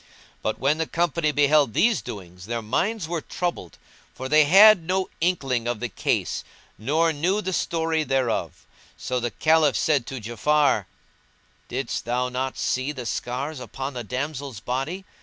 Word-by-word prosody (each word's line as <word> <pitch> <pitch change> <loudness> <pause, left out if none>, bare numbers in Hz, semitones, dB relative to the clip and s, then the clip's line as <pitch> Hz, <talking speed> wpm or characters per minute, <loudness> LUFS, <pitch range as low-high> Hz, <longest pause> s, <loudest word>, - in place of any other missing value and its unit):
But 110 - -2
when 145 +4 +1
the 160 - 0
company 170 -2 0
beheld 145 -4 +3
these 225 -6 +3
doings 90 -2 -9
their 115 0 -3
minds 190 - -1
were 170 -1 -2
troubled, 170 - -4 0.4
for 130 - -5
they 150 +2 +5
had 195 +4 +8
no 185 +3 -1
inkling 135 -9 0
of 120 -2 -1
the 120 - -3
case - - -1 0.3
nor 160 +8 +1
knew 175 +8 0
the 190 -3 -3
story 160 -2 0
thereof; 130 -4 -1 0.3
so 125 0 -2
the 120 0 -1
Caliph 155 +1 +3
said 140 -6 +1
to 135 - -5
Ja'afar, 120 +1 +1 0.8
"Didst 130 0 -3
thou 125 +2 0
not 130 +1 -3
see 130 +3 -1
the 130 -5 -7
scars 130 +6 -3
upon 135 +2 -6
the 120 -1 -5
damsel's 135 0 -4
body? 135 - -3
140 Hz, 160 wpm, -24 LUFS, 125-160 Hz, 0.8 s, had